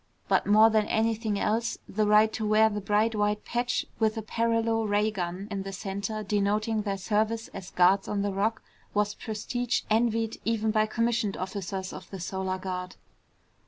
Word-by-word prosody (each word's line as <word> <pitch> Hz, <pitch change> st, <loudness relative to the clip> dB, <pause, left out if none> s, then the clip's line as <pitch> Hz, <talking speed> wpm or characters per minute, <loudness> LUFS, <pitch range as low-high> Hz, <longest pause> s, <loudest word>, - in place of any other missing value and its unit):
But -, -, +2 dB
more 215 Hz, +2 st, +6 dB
than 215 Hz, -1 st, +2 dB
anything 220 Hz, -1 st, 0 dB
else 225 Hz, +2 st, 0 dB
the 215 Hz, +1 st, 0 dB
right 215 Hz, +1 st, +5 dB
to 220 Hz, -, -3 dB
wear 215 Hz, +1 st, +4 dB
the 210 Hz, 0 st, -3 dB
bright 210 Hz, +3 st, +2 dB
white 210 Hz, 0 st, 0 dB
patch 240 Hz, +1 st, -1 dB
with 220 Hz, 0 st, +1 dB
a 220 Hz, -, -3 dB
paralo 230 Hz, 0 st, +1 dB
ray 210 Hz, +1 st, +2 dB
gun 185 Hz, 0 st, -4 dB
in 200 Hz, -1 st, -2 dB
the 195 Hz, 0 st, -6 dB
center 200 Hz, +3 st, -4 dB
denoting 210 Hz, +2 st, 0 dB
their 200 Hz, -2 st, -2 dB
service 220 Hz, +3 st, -1 dB
as 190 Hz, -2 st, -8 dB
guards 185 Hz, +2 st, +3 dB
on 200 Hz, -1 st, -1 dB
the 200 Hz, -1 st, -1 dB
Rock 210 Hz, +4 st, -1 dB, 0.3 s
was 210 Hz, 0 st, +1 dB
prestige 245 Hz, +2 st, -2 dB
envied 225 Hz, 0 st, +1 dB
even 220 Hz, -1 st, 0 dB
by 215 Hz, 0 st, +2 dB
commissioned 230 Hz, -2 st, 0 dB
officers 190 Hz, 0 st, -4 dB
of -, -, -10 dB
the 195 Hz, -, -7 dB
Solar 190 Hz, +1 st, -3 dB
Guard. 185 Hz, -1 st, -5 dB
210 Hz, 175 wpm, -28 LUFS, 200-225 Hz, 0.3 s, more